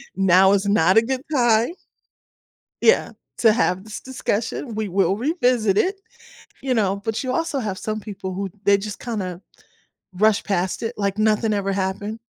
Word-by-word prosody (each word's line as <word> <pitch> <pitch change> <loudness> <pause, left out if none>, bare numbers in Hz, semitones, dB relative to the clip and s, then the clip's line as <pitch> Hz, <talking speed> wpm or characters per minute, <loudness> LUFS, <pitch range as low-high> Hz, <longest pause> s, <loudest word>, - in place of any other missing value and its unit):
now 190 0 +5
is 200 0 +1
not 190 -1 +3
a 225 - +8
good 260 +2 -3
time" 240 0 +3 1.1
Yeah, 460 - +3 0.3
"To 225 -2 +5
have 190 -4 0
this 215 - -8
discussion, 235 -1 -3
we 215 -1 -2
will 190 0 +1
revisit 245 - +1
it," 385 +2 0 0.6
you 265 -1 0
know, 200 -3 0
but 225 +4 -2
you 255 - -2
also 325 -3 -1
have 205 -5 -3
some 215 +2 -4
people 195 -3 -7
who 195 +1 -3
they 200 0 +5
just 205 +1 -6
kinda 190 -7 -5 0.7
rush 215 +2 +2
past 190 -1 -1
it 225 +2 -2
like 200 0 -1
nothing 215 0 +2
ever 195 -1 -1
happened. 200 +3 -3
210 Hz, 165 wpm, -22 LUFS, 195-235 Hz, 1.1 s, a